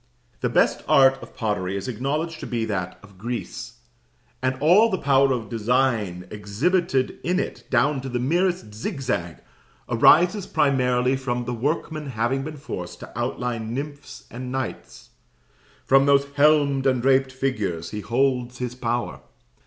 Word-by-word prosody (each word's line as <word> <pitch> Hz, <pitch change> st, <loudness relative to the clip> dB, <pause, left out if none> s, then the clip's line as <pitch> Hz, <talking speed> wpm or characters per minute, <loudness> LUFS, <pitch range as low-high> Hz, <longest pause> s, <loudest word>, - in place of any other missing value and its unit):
The -, -, 0 dB
best -, -, +2 dB
art 135 Hz, 0 st, +5 dB
of -, -, -12 dB
pottery 100 Hz, -4 st, -1 dB
is 100 Hz, -, -5 dB
acknowledged 145 Hz, +7 st, -2 dB
to -, -, -6 dB
be 115 Hz, -2 st, -1 dB
that 95 Hz, -4 st, -3 dB
of 100 Hz, -2 st, -17 dB
Greece, 120 Hz, +3 st, -5 dB, 0.7 s
and 130 Hz, 0 st, 0 dB
all 185 Hz, +10 st, +5 dB
the 190 Hz, -, 0 dB
power 140 Hz, -3 st, +3 dB
of 120 Hz, -4 st, -2 dB
design 115 Hz, -5 st, 0 dB
exhibited 130 Hz, -, 0 dB
in 180 Hz, +2 st, +1 dB
it, -, -, -5 dB
down 135 Hz, +3 st, +2 dB
to 135 Hz, -, -6 dB
the 125 Hz, -, -2 dB
merest 170 Hz, -, 0 dB
zigzag, 110 Hz, -, -3 dB, 0.5 s
arises 175 Hz, -, +4 dB
primarily 125 Hz, -2 st, +2 dB
from 125 Hz, -2 st, -3 dB
the 120 Hz, -, -3 dB
workman 150 Hz, +4 st, -2 dB
having 125 Hz, +2 st, -1 dB
been 155 Hz, +1 st, -7 dB
forced 90 Hz, -, -7 dB
to -, -, -10 dB
outline 120 Hz, -2 st, -3 dB
nymphs 140 Hz, -, -7 dB
and 125 Hz, +1 st, -6 dB
knights; 130 Hz, -2 st, -6 dB, 0.7 s
from 135 Hz, +1 st, +5 dB
those 140 Hz, 0 st, +4 dB
helmed 140 Hz, -2 st, +3 dB
and 130 Hz, -2 st, +1 dB
draped 135 Hz, 0 st, +3 dB
figures 105 Hz, -11 st, -2 dB
he 105 Hz, -, -4 dB
holds 125 Hz, +1 st, 0 dB
his 125 Hz, -1 st, -4 dB
power. 120 Hz, -1 st, -3 dB
130 Hz, 150 wpm, -24 LUFS, 115-140 Hz, 0.7 s, art